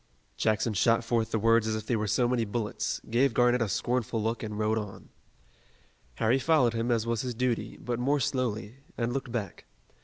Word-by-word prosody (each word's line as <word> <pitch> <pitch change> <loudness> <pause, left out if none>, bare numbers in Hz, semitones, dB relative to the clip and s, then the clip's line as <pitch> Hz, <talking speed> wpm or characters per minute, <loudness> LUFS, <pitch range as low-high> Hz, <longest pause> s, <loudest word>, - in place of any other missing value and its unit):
Jackson 110 +1 +1
shot 115 +4 +3
forth 115 -1 0
the 115 - 0
words 115 +1 +3
as 110 - 0
if 110 -1 -5
they 120 - 0
were 105 -1 -1
so 120 +4 +2
many 120 -1 +1
bullets, 105 -1 -3
gave 125 +1 +2
Garnett 125 0 +4
a 115 - 0
scornful 120 +2 -1
look 115 +2 -1
and 105 -2 -5
rode 110 +1 +1
on. 105 -2 -8 1.1
Harry 115 +4 +2
followed 130 -6 +3
him, 115 +1 -1
as 115 -2 +1
was 115 -2 -1
his 125 -2 -4
duty, 125 -1 -1
but 120 -1 -3
more 140 +4 +2
slowly, 115 -3 -2 0.2
and 120 0 -1
looked 130 -2 -4
back. 105 -7 -4
115 Hz, 195 wpm, -28 LUFS, 110-125 Hz, 1.1 s, Garnett